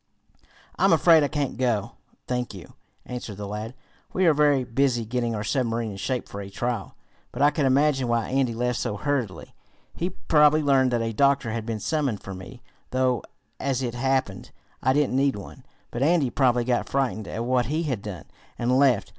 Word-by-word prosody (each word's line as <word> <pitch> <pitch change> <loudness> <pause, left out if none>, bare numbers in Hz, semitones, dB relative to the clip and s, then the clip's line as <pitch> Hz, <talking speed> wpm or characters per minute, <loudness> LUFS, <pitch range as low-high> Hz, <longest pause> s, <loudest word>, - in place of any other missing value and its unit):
"I'm - - +5
afraid 165 -2 +6
I 145 - +2
can't 140 -4 -3
go, 120 -4 0 0.3
thank 125 -4 -3
you," 90 - -11 0.3
answered 120 -5 -6
the 105 -1 -5
lad. 105 +4 -5 0.4
"We 185 - +2
are 165 - +6
very 145 -3 +3
busy 125 -1 +1
getting 120 0 -1
our 105 - -3
submarine 115 -1 -1
in 100 - -8
shape 125 +5 -2
for 100 - -7
a 100 - -8
trial. 115 +1 -3 0.4
But - - -1
I 145 - +6
can 145 -2 +1
imagine 135 -1 +2
why 120 -1 0
Andy 130 -3 +1
left 125 0 -1
so 105 -4 -2
hurriedly. 115 -7 -3 0.4
He 175 - -2
probably 155 -4 +3
learned 135 -2 +4
that 120 -2 0
a 115 0 -2
doctor 140 -1 +2
had 115 0 -4
been 115 -2 -2
summoned 140 -6 -1
for 95 - -7
me, 110 +7 -10 0.3
though, 130 -3 +1 0.4
as 135 -1 -1
it 120 -2 -2
happened, 130 -5 -1 0.3
I 130 - +3
didn't 145 -2 +1
need 135 0 +2
one. 100 - -10 0.3
But 120 - -4
Andy 150 -3 +3
probably 125 -3 +2
got 120 0 0
frightened 110 -7 -1
at 115 +6 -4
what 125 -2 +1
he 155 +5 -1
had 130 -10 -2
done, 95 -7 -7 0.3
and 125 +2 +2
left. 130 -7 +3
125 Hz, 195 wpm, -25 LUFS, 115-140 Hz, 0.4 s, afraid